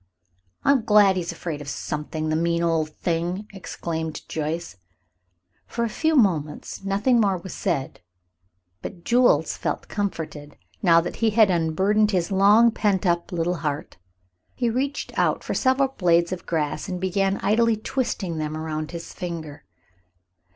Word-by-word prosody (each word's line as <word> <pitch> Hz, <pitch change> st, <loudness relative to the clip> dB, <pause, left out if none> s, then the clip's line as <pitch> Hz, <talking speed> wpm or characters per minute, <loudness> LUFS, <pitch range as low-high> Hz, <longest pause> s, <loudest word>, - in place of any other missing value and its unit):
"I'm 275 Hz, -4 st, +3 dB
glad 210 Hz, -3 st, +5 dB
he 185 Hz, -, 0 dB
is 170 Hz, -, -4 dB
afraid 165 Hz, -3 st, -5 dB
of 145 Hz, -, -9 dB
something, 155 Hz, +2 st, -4 dB
the 155 Hz, -, +1 dB
mean 170 Hz, +1 st, +1 dB
old 165 Hz, -2 st, +1 dB
thing!" 175 Hz, +5 st, -2 dB
exclaimed 160 Hz, -4 st, -5 dB
Joyce. 155 Hz, -, -4 dB, 0.9 s
For 235 Hz, -, -2 dB
a 230 Hz, -, 0 dB
few 315 Hz, +7 st, +1 dB
moments 165 Hz, -, 0 dB
nothing 210 Hz, +5 st, +2 dB
more 195 Hz, -3 st, +2 dB
was 180 Hz, +2 st, -8 dB
said, 160 Hz, -, -2 dB, 0.8 s
but 170 Hz, -, -8 dB
Jules 245 Hz, +1 st, +3 dB
felt -, -, -3 dB
comforted 160 Hz, -7 st, -4 dB, 0.2 s
now 170 Hz, -3 st, +5 dB
that -, -, -6 dB
he 225 Hz, -, +2 dB
had 215 Hz, -2 st, +5 dB
unburdened 190 Hz, +6 st, +2 dB
his 185 Hz, -2 st, 0 dB
long 205 Hz, +4 st, +6 dB
pent 205 Hz, -3 st, 0 dB
up 175 Hz, +1 st, 0 dB
little 175 Hz, 0 st, -1 dB
heart. 150 Hz, -2 st, -4 dB, 0.6 s
He 240 Hz, -2 st, 0 dB
reached 275 Hz, +4 st, -2 dB
out -, -, +1 dB
for -, -, -3 dB
several 265 Hz, +1 st, +2 dB
blades 170 Hz, -8 st, +2 dB
of 185 Hz, -, -5 dB
grass 155 Hz, 0 st, -2 dB
and 180 Hz, -1 st, -3 dB
began 195 Hz, +1 st, 0 dB
idly 230 Hz, +1 st, +3 dB
twisting 210 Hz, -8 st, -2 dB
them 155 Hz, 0 st, -3 dB
around 155 Hz, -1 st, -4 dB
his 170 Hz, -1 st, -8 dB
finger. 165 Hz, -5 st, -6 dB
180 Hz, 150 wpm, -24 LUFS, 160-210 Hz, 0.9 s, long